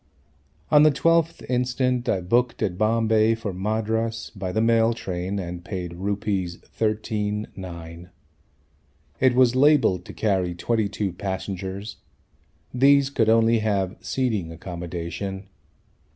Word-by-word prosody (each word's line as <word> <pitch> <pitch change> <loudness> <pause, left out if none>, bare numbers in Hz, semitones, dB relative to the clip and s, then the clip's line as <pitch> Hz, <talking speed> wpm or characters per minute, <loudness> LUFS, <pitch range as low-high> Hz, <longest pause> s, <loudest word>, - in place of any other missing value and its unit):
On 150 - +7
the 155 - +7
12th 165 +3 +1
instant 125 0 0
I 95 - +1
booked 120 +7 +1
at 90 -4 -1
Bombay 110 +1 +2
for 110 -3 -5
Madras 110 +3 -2
by 95 -2 -4
the 110 - 0
mail 115 0 +3
train 95 -2 -4
and 90 -2 -5
paid 90 -3 -5
Rs. 100 -3 -2
13 105 -1 -2
9. 85 -2 -9 1.1
It 130 -1 +4
was 125 -1 +4
labelled 130 - +4
to - - -9
carry 95 -5 0
22 105 -1 -1
passengers. 95 +2 -5 0.8
These 140 +2 +4
could 110 -5 +2
only 115 0 +4
have 100 -2 0
seating 110 -11 -1
accommodation. 85 +3 -6
105 Hz, 120 wpm, -24 LUFS, 95-115 Hz, 1.1 s, On